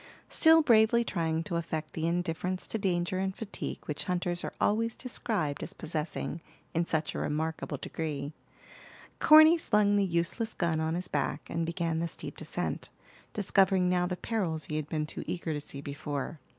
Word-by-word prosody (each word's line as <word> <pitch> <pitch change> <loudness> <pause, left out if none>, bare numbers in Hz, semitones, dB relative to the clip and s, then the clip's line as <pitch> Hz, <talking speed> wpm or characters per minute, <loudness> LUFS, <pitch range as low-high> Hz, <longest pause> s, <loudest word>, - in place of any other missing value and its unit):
Still 320 0 +6
bravely 235 -2 +5
trying 165 -6 -1
to 170 +1 -2
affect 160 -2 -4
the 160 0 -1
indifference 175 +2 -1
to 220 - -3
danger 180 -1 0
and 190 0 -1
fatigue 220 -3 -5
which 150 - -3
hunters 175 -1 0
are - - -5
always 225 +2 +1
described 210 - -2
as - - -5
possessing 160 0 -3 0.3
in 170 +1 0
such 155 -1 0
a - - -3
remarkable 160 +2 -2
degree, 150 -2 -4 0.9
Corny 315 +2 +8
slung 210 -7 +3
the 200 - +3
useless 185 +5 -1
gun 170 -3 0
on 160 +1 0
his 180 +1 -3
back 140 0 -2
and 165 0 -1
began 165 -1 -1
the 170 - 0
steep - - -6
descent, - - -3 0.4
discovering 190 -2 +3
now 180 0 +2
the 180 0 -3
perils 180 -9 -2
he 155 - -3
had 155 -1 -4
been 155 -1 -1
too - - -6
eager 170 -3 -2
to 145 - -3
see 140 -1 -7
before. 145 +1 -4
170 Hz, 175 wpm, -30 LUFS, 160-195 Hz, 0.9 s, Corny